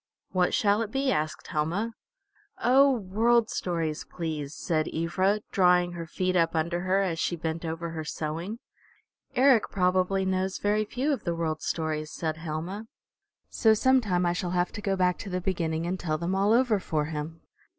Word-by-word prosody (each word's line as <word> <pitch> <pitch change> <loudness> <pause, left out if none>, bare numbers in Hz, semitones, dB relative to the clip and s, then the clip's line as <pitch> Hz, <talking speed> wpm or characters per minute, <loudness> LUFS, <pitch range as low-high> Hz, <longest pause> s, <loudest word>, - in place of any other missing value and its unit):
"What 180 -1 +2
shall 205 +1 +3
it 220 - -2
be?" 270 +3 0
asked 155 -8 -2
Helma. 180 +9 -1 0.6
"Oh, 270 +3 +5
World 230 +1 +2
Stories, 165 -4 -2
please," 155 -4 -5
said 155 -3 -1
Ivra, 185 +6 +1
drawing 180 -2 +4
her 170 -1 -6
feet 185 +3 -1
up 165 -1 +2
under 170 +2 0
her 185 +2 +1
as 170 -4 -2
she 175 - 0
bent 160 0 -4
over 165 +1 -4
her 160 -1 -4
sewing. 165 +7 -4 0.8
"Eric 255 -3 +5
probably 185 +1 +1
knows 190 0 0
very 210 +1 +1
few 265 +7 -1
of 255 - -4
the 170 - -1
World 160 -2 -2
Stories," 155 -2 -2
said 160 -1 -3
Helma. 165 +7 -5 0.6
"So 220 -2 +4
sometime 215 -8 +2
I 175 - +2
shall 175 0 -2
have 175 0 +1
to 205 - -7
go 195 -1 0
back 180 -1 +1
to 200 - -6
the 180 0 -1
beginning 170 -3 -1
and 180 +2 -2
tell 155 -3 -1
them 170 +3 -2
all 195 +2 +2
over 235 -3 +3
for 155 -5 -1
him." 160 +1 -5
180 Hz, 180 wpm, -27 LUFS, 165-205 Hz, 0.8 s, Oh